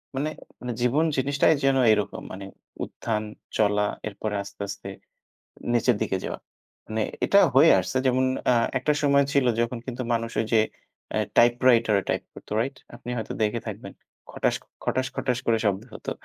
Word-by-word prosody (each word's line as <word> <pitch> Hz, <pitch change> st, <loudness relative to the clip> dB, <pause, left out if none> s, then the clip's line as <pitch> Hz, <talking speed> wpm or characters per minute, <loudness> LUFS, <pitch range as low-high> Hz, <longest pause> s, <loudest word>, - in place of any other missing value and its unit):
মানে 145 Hz, +3 st, -1 dB, 0.3 s
মানে 125 Hz, -1 st, -4 dB
জীবন 140 Hz, +7 st, +3 dB
জিনিসটাই 140 Hz, +4 st, +3 dB
যেন 135 Hz, -1 st, +4 dB, 0.2 s
এরকম 105 Hz, -1 st, -2 dB
মানে 95 Hz, +1 st, -7 dB, 0.4 s
উত্থান, 110 Hz, -2 st, -3 dB, 0.3 s
চলা, 105 Hz, -1 st, +3 dB, 0.2 s
এরপরে 105 Hz, 0 st, -4 dB
আস্তে, 100 Hz, -, -11 dB
আস্তে 100 Hz, 0 st, -7 dB, 0.8 s
নিচের 120 Hz, 0 st, +3 dB
দিকে 95 Hz, -3 st, 0 dB
যাওয়া। -, -, -4 dB, 0.5 s
মানে 110 Hz, 0 st, -2 dB, 0.2 s
এটা -, -, +5 dB, 0.2 s
হয়ে -, -, +8 dB
আসছে। 130 Hz, -, -2 dB
যেমন 130 Hz, +1 st, +3 dB, 0.2 s
অ্যা 125 Hz, -, +5 dB, 0.2 s
একটা 150 Hz, +3 st, +1 dB
সময় 140 Hz, -1 st, +4 dB
ছিল 140 Hz, -2 st, +3 dB, 0.2 s
যখন 120 Hz, +1 st, -1 dB
কিন্তু 125 Hz, 0 st, -5 dB
মানুষ 115 Hz, 0 st, -1 dB
ওইযে 110 Hz, 0 st, +2 dB, 0.5 s
অ্যা -, -, 0 dB, 0.2 s
টাইপ 120 Hz, 0 st, +7 dB, 0.2 s
রাইটার 115 Hz, -3 st, +4 dB
এ -, -, -13 dB
টাইপ -, -, 0 dB
করতো -, -, -14 dB
করত, 105 Hz, -, 0 dB
রাইট? 135 Hz, +3 st, -3 dB, 0.2 s
আপনি 120 Hz, -, -9 dB
হয়তো 110 Hz, -, -4 dB
দেখে 110 Hz, +2 st, +1 dB
থাকবেন, -, -, -7 dB, 0.4 s
খটাস, -, -, 0 dB, 0.3 s
খটাস, 130 Hz, 0 st, 0 dB
খটাস 125 Hz, -2 st, 0 dB
করে 115 Hz, -1 st, +3 dB
শব্দ 100 Hz, -1 st, +1 dB
হতো। -, -, -6 dB
120 Hz, 170 wpm, -25 LUFS, 105-130 Hz, 0.8 s, হয়ে